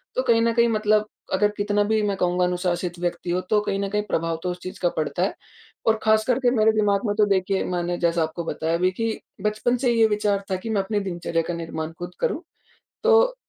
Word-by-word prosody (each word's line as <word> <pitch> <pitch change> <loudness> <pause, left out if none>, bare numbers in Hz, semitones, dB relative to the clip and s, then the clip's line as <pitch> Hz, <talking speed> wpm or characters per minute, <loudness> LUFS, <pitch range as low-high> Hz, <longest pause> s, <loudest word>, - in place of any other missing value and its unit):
तो - - +1
कहीं 230 0 +3
न 230 0 +2
कहीं 235 0 +4
मतलब 215 -1 +2 0.3
अगर 200 +2 +4
कितना 205 0 +1
भी, 215 +1 +1
मैं 200 -2 0
कहूँगा, 180 -1 +1
अनुशासित 180 -1 -2
व्यक्ति 175 0 -3
हो, 180 +1 +1
तो 210 +3 +1
कहीं 195 -1 -2
न 200 - -1
कहीं 210 +1 0
प्रभाव 165 0 -1
तो 180 - -1
उस 180 - -7
चीज़ 185 +2 -7
का 175 - +3
पड़ता 155 +3 -1
है। 195 - 0 0.5
और 220 -1 +3
खासकर 220 +3 +3
के 250 -2 +3
मेरे 220 -3 +4
दिमाग 205 0 +1
में 205 - 0
तो, 210 0 +4
देखिए, 195 -1 +1
मैंने 175 -1 -2
जैसा 170 -1 +1
आपको 160 +2 -4
बताया 160 0 -2
अभी 180 +2 +2
कि 225 +3 -2 0.2
बचपन 215 +4 0
से 245 0 +1
ये 225 -1 +5
विचार 210 -2 0
था - - +2
कि 185 +5 -6
मैं 210 -3 +1
अपनी 205 +2 -1
दिनचर्या 175 -3 -2
का 175 - -2
निर्माण 165 -1 -4
खुद 175 0 -5
करूँ। 320 - 0 0.6
तो 470 +2 +5
200 Hz, 230 wpm, -24 LUFS, 175-220 Hz, 0.6 s, ये